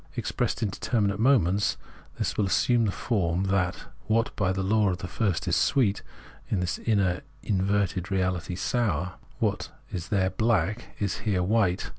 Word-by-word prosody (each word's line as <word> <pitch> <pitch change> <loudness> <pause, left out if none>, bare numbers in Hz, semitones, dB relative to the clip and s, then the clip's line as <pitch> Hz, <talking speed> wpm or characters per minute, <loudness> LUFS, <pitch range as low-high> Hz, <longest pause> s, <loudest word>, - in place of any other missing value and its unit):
Expressed - - -1
in 105 - 0
determinate 100 -2 0
moments, 105 -6 +3 0.4
this - - -1
will 105 - +1
assume 120 +4 +3
the 100 - +1
form 95 -5 0
that 95 -2 0 0.2
what 115 +2 +1
by 95 -3 +1
the 95 +1 -1
law 105 +1 +3
of 90 - -1
the 90 - -6
first 100 -1 -1
is - - +2
sweet, 110 -8 +2
is, - - -21
in 100 - +1
this 90 -1 -2
inner, 100 -5 +1 0.2
inverted 95 -2 0
reality, 90 -2 -1
sour; 90 - 0 0.2
what - - -1 0.2
is 85 -3 -4
there 95 -2 +2
black 110 -1 0
is 100 -5 -2
here 95 -4 0
white. 100 -2 +1
100 Hz, 165 wpm, -27 LUFS, 90-110 Hz, 0.4 s, moments